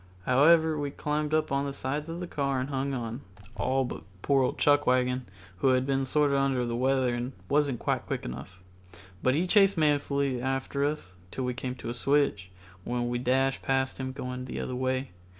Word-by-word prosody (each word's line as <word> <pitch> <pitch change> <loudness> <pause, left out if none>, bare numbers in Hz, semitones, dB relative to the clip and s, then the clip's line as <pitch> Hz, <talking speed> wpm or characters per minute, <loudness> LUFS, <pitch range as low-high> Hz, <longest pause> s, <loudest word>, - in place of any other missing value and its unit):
However, 160 +4 +5
we 145 -1 -2
climbed 150 +1 -2
on 140 -3 +1
the 140 - -4
sides 145 +4 -3
of 170 +2 -5
the 180 - -4
cars 140 -4 -1
and 130 - -4
hung 135 0 -1
on, 120 +1 -4 0.3
all 130 +5 +1
but - - -6 0.2
poor 140 -1 +3
old 130 - 0
Chuckwagon, 130 -3 +2 0.3
who 95 - +1
had 130 0 +3
been 135 0 0
sorter 145 +1 +2
under 135 -2 +1
the 120 0 -2
weather 130 0 +2
and 120 +2 -3
wasn't 145 -3 +2
quite - - -1
quick - - -3
enough. 70 +9 -8 0.6
But 130 +1 +2
he 170 +4 +1
chased 195 0 +4
manfully 140 -4 +1
after 135 +2 -1
us 145 -12 -3 0.2
till 130 - -4
we 125 0 -1
came 125 +1 -4
to 120 - -7
a - - -2
switch, 125 -8 +1 0.3
when 120 +2 -2
we 120 0 -1
dashed 135 +2 +1
past 135 0 0
him 130 0 -3
going 125 -1 -5
the 130 - -5
other 125 - -3
way. 130 +1 -1
135 Hz, 195 wpm, -28 LUFS, 125-145 Hz, 0.6 s, However